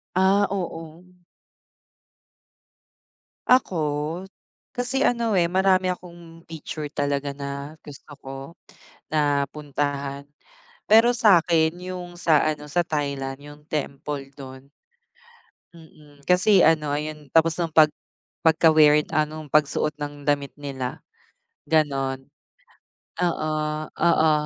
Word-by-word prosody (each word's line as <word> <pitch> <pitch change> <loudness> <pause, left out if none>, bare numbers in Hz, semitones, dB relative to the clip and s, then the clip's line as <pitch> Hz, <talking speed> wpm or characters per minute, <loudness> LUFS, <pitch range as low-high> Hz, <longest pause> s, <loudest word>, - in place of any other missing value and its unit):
Ah, 195 +2 +4
oo. 170 -3 -6 2.4
Ako, 250 -7 +3 1.0
kasi 250 +2 0
ano 230 -3 +1
eh, 170 -1 +2
marami 185 -1 +3
akong 170 -2 -13
picture 155 -1 -6
talaga 145 -1 -2
na 140 +2 -6
gusto 145 0 -13
ko 135 -1 -10 0.8
na 145 -2 +2
puntahan. 140 -1 -4 0.6
Pero 225 +2 +6
sakin, 170 -7 +4 0.2
yung 175 -1 -7
sa 155 -3 +4
ano 150 0 -11
sa 175 +3 +1
Thailand, 140 -3 -3
yung 145 +1 -13
temple 140 -1 -4
dun. 130 0 -11 1.1
Mm, 150 -3 -18
kasi 180 +5 +4
ano 155 -3 +3
ayun 150 0 -5
tapos 165 0 +4
nung 165 -3 -2
pag 155 -2 +6 0.6
pagka-weird 155 -2 +5
ah, 155 -1 +1
nong 155 -1 -9
pagsuot 150 0 +1
ng 145 0 -6
damit 145 -1 -1
nila, 135 -3 -6 0.6
ganon. 135 -4 0 0.9
Oo, 155 -3 -1
oo 160 -2 +2
155 Hz, 105 wpm, -24 LUFS, 145-170 Hz, 2.4 s, Pero